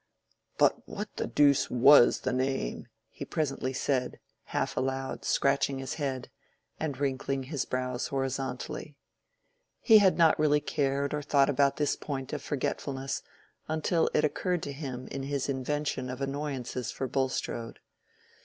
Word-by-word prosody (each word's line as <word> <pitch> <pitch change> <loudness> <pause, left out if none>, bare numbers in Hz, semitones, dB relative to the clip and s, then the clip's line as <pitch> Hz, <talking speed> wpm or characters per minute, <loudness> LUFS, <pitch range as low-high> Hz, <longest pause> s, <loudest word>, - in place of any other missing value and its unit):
"But - - +2
what - - -6
the - - -1
deuce 145 -2 +4
was 125 +1 +6
the 130 - -1
name?" 130 - -2 0.2
he - - -7
presently 140 -4 -2
said, 130 -1 -1 0.3
half - - -2
aloud, 135 0 -2
scratching 140 0 +2
his 135 +1 -4
head, 130 -3 -3 0.5
and 150 -4 -2
wrinkling 135 -1 -1
his 140 0 -3
brows 125 -1 -2
horizontally. 135 +2 -3 0.8
He 220 -3 +7
had 190 -3 +4
not 165 -3 +5
really 150 -1 +4
cared 140 -1 -1
or 150 - -1
thought 145 -1 +3
about 140 0 +2
this 150 -2 +1
point 135 -3 -5
of - - -3
forgetfulness 135 -1 -3 0.5
until 160 +2 +1
it 150 - +4
occurred 175 +4 -1
to 140 - -4
him 130 -3 -6
in 135 - -4
his 140 0 -2
invention 140 -1 -2
of 125 0 -5
annoyances 135 -3 -3
for 135 - -3
Bulstrode. 130 -3 -2
135 Hz, 145 wpm, -29 LUFS, 130-145 Hz, 0.8 s, He